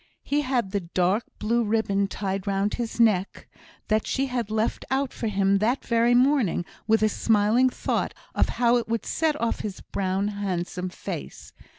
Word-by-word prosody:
He 290 Hz, +1 st, +1 dB
had 255 Hz, -8 st, -1 dB
the 200 Hz, -, 0 dB
dark 185 Hz, +4 st, 0 dB
blue 235 Hz, +2 st, +1 dB
ribbon 205 Hz, -2 st, +1 dB
tied 195 Hz, 0 st, -3 dB
round 200 Hz, +1 st, 0 dB
his 235 Hz, -1 st, -4 dB
neck 205 Hz, -5 st, +2 dB, 0.4 s
that 215 Hz, 0 st, +1 dB
she 270 Hz, -, 0 dB
had 245 Hz, -5 st, -3 dB
left 220 Hz, +1 st, -1 dB
out 270 Hz, 0 st, 0 dB
for 230 Hz, -, -3 dB
him 195 Hz, -1 st, +2 dB
that 235 Hz, +6 st, 0 dB
very 235 Hz, +1 st, +3 dB
morning, 250 Hz, -, +3 dB, 0.2 s
with 220 Hz, -1 st, +3 dB
a -, -, +5 dB
smiling 220 Hz, +4 st, +3 dB
thought -, -, -2 dB, 0.2 s
of -, -, +1 dB
how 240 Hz, 0 st, +4 dB
it 235 Hz, -, -2 dB
would 230 Hz, -2 st, -2 dB
set 310 Hz, -2 st, 0 dB
off 235 Hz, -, -1 dB
his 200 Hz, -3 st, -5 dB
brown, 195 Hz, +1 st, -1 dB
handsome 185 Hz, -3 st, -3 dB
face. -, -, -7 dB
215 Hz, 175 wpm, -25 LUFS, 195-240 Hz, 0.4 s, a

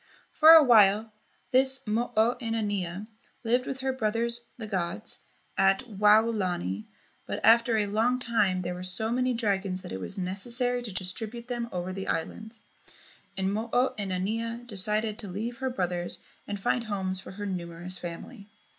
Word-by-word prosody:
For 315 Hz, -, +6 dB
a 320 Hz, -1 st, +9 dB
while 215 Hz, -3 st, +5 dB, 0.4 s
this 265 Hz, +1 st, +3 dB
Mo 230 Hz, +3 st, -1 dB
o 225 Hz, +2 st, +4 dB
inanea 205 Hz, -5 st, -2 dB, 0.4 s
lived 245 Hz, +2 st, +1 dB
with 265 Hz, 0 st, -4 dB
her 265 Hz, 0 st, 0 dB
brothers, 235 Hz, 0 st, -1 dB
the 225 Hz, -, -6 dB
gods, 190 Hz, 0 st, -3 dB, 0.4 s
at 195 Hz, +3 st, +4 dB
Waolani, 205 Hz, -, +2 dB, 0.4 s
but -, -, -3 dB
after 230 Hz, 0 st, +5 dB
a 210 Hz, -, +1 dB
long 220 Hz, +5 st, +1 dB
time 210 Hz, -7 st, +1 dB
there 175 Hz, +1 st, -3 dB
were 180 Hz, -, -7 dB
so 185 Hz, +5 st, -1 dB
many 250 Hz, 0 st, +1 dB
dragons 195 Hz, -4 st, -1 dB
that -, -, -8 dB
it 95 Hz, -, -4 dB
was 190 Hz, -, -2 dB
necessary 240 Hz, +7 st, +1 dB
to 235 Hz, -3 st, -6 dB
distribute 215 Hz, +6 st, -4 dB
them 240 Hz, -1 st, -3 dB
over 180 Hz, +1 st, -4 dB
the 195 Hz, 0 st, -5 dB
islands, 220 Hz, +7 st, -4 dB, 0.8 s
and 190 Hz, +1 st, 0 dB
Mo 220 Hz, +3 st, -3 dB
o 250 Hz, +2 st, +2 dB
inanea 220 Hz, +5 st, -3 dB
decided 215 Hz, 0 st, +1 dB
to 210 Hz, -, -4 dB
leave 220 Hz, +6 st, -4 dB
her 265 Hz, 0 st, -2 dB
brothers 180 Hz, -6 st, -2 dB, 0.3 s
and 205 Hz, -, -4 dB
find 235 Hz, +4 st, 0 dB
homes 190 Hz, -3 st, -2 dB
for 190 Hz, -, -10 dB
her 205 Hz, +1 st, -6 dB
numerous 175 Hz, -1 st, -5 dB
family. 200 Hz, +5 st, -8 dB
210 Hz, 165 wpm, -28 LUFS, 185-235 Hz, 0.8 s, a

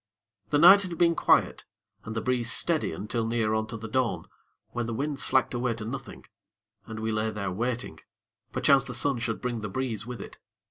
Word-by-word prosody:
The 145 Hz, -, +2 dB
night 190 Hz, +6 st, +9 dB
had 180 Hz, -4 st, -5 dB
been 170 Hz, 0 st, +4 dB
quiet, -, -, +2 dB, 0.4 s
and 110 Hz, -, -6 dB
the 115 Hz, -, -1 dB
breeze 125 Hz, -2 st, +1 dB
steady 165 Hz, +4 st, 0 dB
until 115 Hz, +3 st, -3 dB
near 115 Hz, -2 st, 0 dB
on 110 Hz, 0 st, 0 dB
to 115 Hz, -, -6 dB
the 110 Hz, +1 st, -7 dB
dawn, 125 Hz, +2 st, -1 dB, 0.4 s
when 120 Hz, -1 st, -3 dB
the 115 Hz, -, -3 dB
wind 145 Hz, +2 st, -2 dB
slacked 130 Hz, -, +2 dB
away 120 Hz, -1 st, -1 dB
to 110 Hz, -1 st, -7 dB
nothing, 130 Hz, +5 st, -7 dB, 0.6 s
and 110 Hz, -1 st, -6 dB
we 110 Hz, 0 st, -1 dB
lay 110 Hz, 0 st, 0 dB
there 100 Hz, -3 st, -4 dB
waiting, 120 Hz, +5 st, -3 dB, 0.5 s
perchance 140 Hz, -3 st, +4 dB
the 125 Hz, -, -5 dB
sun 130 Hz, +1 st, 0 dB
should 115 Hz, -1 st, -2 dB
bring 120 Hz, -3 st, -3 dB
the 105 Hz, -, -4 dB
breeze 115 Hz, -1 st, -3 dB
with 125 Hz, -1 st, -6 dB
it. -, -, -10 dB
120 Hz, 200 wpm, -27 LUFS, 110-130 Hz, 0.6 s, night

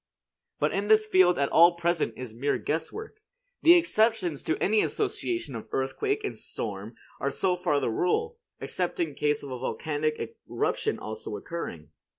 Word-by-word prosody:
But -, -, +2 dB
in 200 Hz, +1 st, -1 dB
this 215 Hz, 0 st, +5 dB
field 185 Hz, -4 st, +4 dB
all 165 Hz, +5 st, +6 dB
at -, -, -18 dB
present 170 Hz, -9 st, 0 dB
is 125 Hz, -3 st, -7 dB
mere 135 Hz, +5 st, 0 dB
guess 160 Hz, +2 st, -2 dB
work. 435 Hz, 0 st, -8 dB, 0.4 s
The 340 Hz, +2 st, +8 dB
exceptions 220 Hz, -, +2 dB
to 160 Hz, -, -1 dB
any 215 Hz, +2 st, +3 dB
association 395 Hz, -, -1 dB
of 110 Hz, -, -7 dB
earthquake 410 Hz, -, -1 dB
and 415 Hz, -, -3 dB
storm -, -, -5 dB, 0.2 s
are -, -, 0 dB
so 185 Hz, -2 st, +1 dB
far 150 Hz, -5 st, +1 dB
the 130 Hz, -4 st, -1 dB
rule; 455 Hz, -, 0 dB, 0.2 s
except -, -, -2 dB
in 340 Hz, -, 0 dB
case 150 Hz, -1 st, 0 dB
of 140 Hz, -, -7 dB
a 125 Hz, -, -4 dB
volcanic 155 Hz, +3 st, -2 dB, 0.3 s
eruption -, -, 0 dB
also 110 Hz, -1 st, -6 dB
occurring. 85 Hz, -, -6 dB
170 Hz, 165 wpm, -27 LUFS, 140-225 Hz, 0.4 s, The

